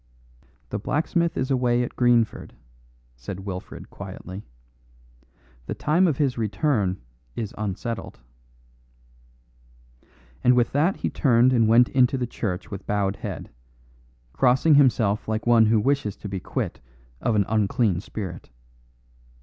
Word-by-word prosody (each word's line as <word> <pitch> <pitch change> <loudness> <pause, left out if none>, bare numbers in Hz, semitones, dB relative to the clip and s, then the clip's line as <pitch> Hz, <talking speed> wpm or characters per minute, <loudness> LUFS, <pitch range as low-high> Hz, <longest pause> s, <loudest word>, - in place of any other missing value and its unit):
"The - - -3
blacksmith 165 - 0
is 130 - -1
away 125 -2 +2
at 120 - -6
Greenford," 120 -2 +1 0.6
said 60 +11 -7
Wilfred 95 -2 -8
quietly; 95 +3 -8 1.2
"the - - -3
time 170 +5 +2
of 150 -6 0
his 135 -5 0
return 105 -4 0 0.4
is 110 -3 -4
unsettled." 110 +3 -5 2.2
And 125 0 +5
with 120 -2 +2
that 155 +7 +2
he - - -3
turned 125 -2 +3
and 115 -3 +3
went 120 +2 +6
into 130 0 +3
the 125 - -1
church 100 -5 -4
with 100 -1 -7
bowed 100 -1 0
head, - - -7 0.8
crossing 135 +5 +3
himself 115 -7 +3
like 110 0 -2
one 115 -2 +5
who 110 0 +3
wishes 130 -3 0
to - - -8
be 95 -1 -4
quit - - -4 0.4
of 115 - +1
an 100 -2 +3
unclean 105 -3 +1
spirit. 95 -3 -7
115 Hz, 130 wpm, -24 LUFS, 100-130 Hz, 2.2 s, went